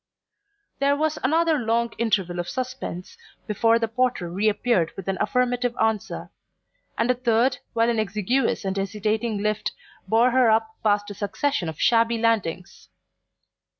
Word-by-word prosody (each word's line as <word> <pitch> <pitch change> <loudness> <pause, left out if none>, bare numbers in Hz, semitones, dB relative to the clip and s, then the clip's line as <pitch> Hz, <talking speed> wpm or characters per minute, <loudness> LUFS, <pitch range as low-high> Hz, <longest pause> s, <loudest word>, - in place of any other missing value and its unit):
There 280 +1 +3
was 310 0 0
another 320 +3 +2
long 235 0 0
interval 190 -6 0
of 175 - -3
suspense 255 -8 -5 0.3
before 225 +2 +3
the 230 -1 -1
porter 230 -7 -1
reappeared 210 -2 +1
with 195 - -7
an 195 -1 -2
affirmative 245 -1 0
answer; 220 -2 -1 0.7
and 230 +2 +2
a - - +3
third 245 +1 +1
while 230 -1 +2
an 235 -2 +1
exiguous 215 +3 0
and 190 0 -1
hesitating 210 +2 -1
lift 215 0 -1 0.3
bore 235 +3 +4
her 255 -2 +4
up 220 0 +1
past 205 -1 +1
a - - -5
succession 205 - -2
of 160 - -8
shabby 230 0 +3
landings. 210 -6 -1
225 Hz, 145 wpm, -24 LUFS, 205-245 Hz, 0.7 s, bore